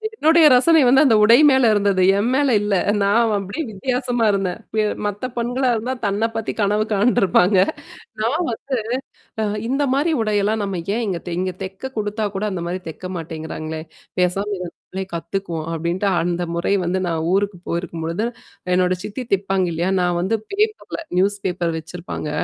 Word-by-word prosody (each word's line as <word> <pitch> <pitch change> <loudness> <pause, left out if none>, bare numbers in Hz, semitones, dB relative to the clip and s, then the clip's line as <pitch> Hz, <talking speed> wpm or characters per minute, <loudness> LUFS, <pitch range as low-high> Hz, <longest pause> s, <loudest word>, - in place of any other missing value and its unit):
என்னுடைய 320 -2 +5
ரசனை 320 +5 +5
வந்து 270 +4 +6
அந்த 230 -4 +5
உடை 230 +3 +7
மேல 265 -4 +4
இருந்தது. 200 -2 +2 0.2
என் 220 +4 +1
மேல 270 -2 +3
இல்ல, 205 0 -1 0.3
நான் 225 +3 +3
அப்படியே 200 - -4
வித்தியாசமா 245 +2 -1
இருந்தேன் 195 0 -1 0.2
ப - - -1 0.3
மத்த 205 +4 -3
பெண்களா 245 +2 0
இருந்தா 245 +4 -2
தன்ன 205 +3 +1
பத்தி 225 - -2
கனவு 210 +2 +2
காண்டுருப்பாங்க. 200 -3 +3 0.7
நான் 230 +6 +1
வந்து 320 -10 -1 0.9
அ - - +1 0.2
இந்த 275 +3 0
மாரி 300 +4 +1
உடையெல்லாம் 210 0 +1
நம்ம 190 -4 -3
ஏன் 235 - -1
இங்க 180 -3 -2
தெ 170 - -3
இங்க 185 -1 -1
தெக்க 195 +8 -6
குடுத்தா 210 +1 -1
கூட 205 +2 -1
அந்த 175 -2 -3
மாரி 185 +1 -3
தெக்க 185 +3 -7
மாட்டேங்கிறாங்களேன் 160 -1 -6 0.3
பேசாம 185 +3 0
இத 180 - -4
நம்மளே 190 0 -7
கத்துக்குவோம் 170 -2 -4
அப்டின்ட்டு 170 +5 -1
அந்த 175 +1 -1
முறை 170 +4 0
வந்து 185 +2 0
நான் 160 -1 -1
ஊருக்கு 200 -2 0
போயிருக்கும்பொழுது 170 +3 -3 0.5
என்னோட 185 0 +2
சித்தி 230 +5 -5
தெப்பாங்க 190 -1 -1
இல்லயா? 175 +4 0
நான் 175 -1 +1
வந்து 220 +5 0 0.2
பேப்பர்ல 430 -1 -1 0.2
நியூஸ் 200 +2 +2
பேப்பர் 175 -2 -1
வச்சிருப்பாங்க, 165 -1 -6
200 Hz, 165 wpm, -21 LUFS, 180-235 Hz, 0.9 s, உடை